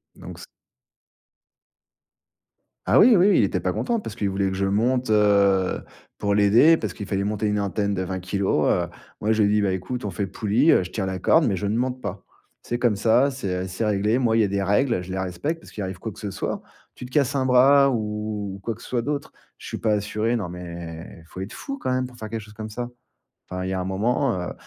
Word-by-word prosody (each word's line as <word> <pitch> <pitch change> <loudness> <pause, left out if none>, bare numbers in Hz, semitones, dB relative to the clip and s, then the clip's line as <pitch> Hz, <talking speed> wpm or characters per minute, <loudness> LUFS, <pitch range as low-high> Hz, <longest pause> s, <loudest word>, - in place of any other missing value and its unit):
Donc - - -10
c - - -9 2.4
Ah - - +4
oui, 245 - +7
oui, 185 +1 +5
oui, - - +4
il - - +4
était - - 0
pas - - -1
content 235 -2 -1
parce 115 - -7
qu'il 105 -4 -1
voulait 95 0 0
que 95 - -3
je 100 +1 0
monte, 120 +5 +1
heu, 100 -3 +3 0.4
pour 100 0 0
l'aider, 110 +11 +6
parce 105 - -4
qu'il 100 - -7
fallait 100 0 -1
monter 105 +1 -2
une 105 0 0
antenne 100 0 -1
de 95 - -2
20 95 0 -3
kilos, 95 +2 0
heu. - - +1 0.3
Moi, 105 - +1
je 110 -1 +3
lui 100 - +3
ai - - +2
dit: 105 - +3
«Bah 100 -2 +1
écoute, 95 +6 -4
on 100 - -2
fait 95 +3 -2
poulie, 110 - +2
heu, - - +4
je 90 - -9
tiens 100 - -2
la 95 -1 -3
corde, 160 - +4
mais 100 - +1
je 100 +2 -3
ne 105 - 0
monte 125 +1 -2
pas». 100 -2 -5 0.4
C'est 120 - -3
comme 120 -4 +2
ça, 120 +7 +3
c'est, 95 -9 -3
heu, - - -5
c'est 95 +5 -3
réglé. 105 +2 +1
Moi, 115 -3 +2
il - - +4
y - - +4
a - - +2
des 100 0 -1
règles, 105 +2 +2
je 90 - -8
les 95 - -2
respecte 95 - -3
parce - - -15
qu'il 105 - -5
arrive 95 -1 -5
quoi 110 - -5
que - - -14
ce 105 -2 -4
soit. - - -3 0.3
Tu - - -8
te 125 - -12
casses 140 0 +1
un 135 -1 +1
bras 135 +2 +6
ou 105 -3 -3
quoi 115 - -2
que 115 - -17
ce - - -11
soit 120 -2 0
d'autre, 145 +3 -3 0.3
je - - -11
suis - - -4
pas 110 - 0
assuré, 105 +3 0
non. 100 -7 -3
Mais 85 -2 -8
il - - -19
faut 90 +3 -9
être 95 - -6
fou, 275 0 -6
quand 130 - -2
même, 130 0 0
pour 125 -1 -15
faire 110 -1 -7
quelque 115 0 -4
chose 105 0 -14
comme 110 0 -7
ça! 120 +3 -5 0.6
Enfin, 90 0 -4
il 95 - -3
y - - -2
a 95 - -1
un - - -3
moment, 110 +4 0
heu - - -5
105 Hz, 265 wpm, -24 LUFS, 95-120 Hz, 2.4 s, oui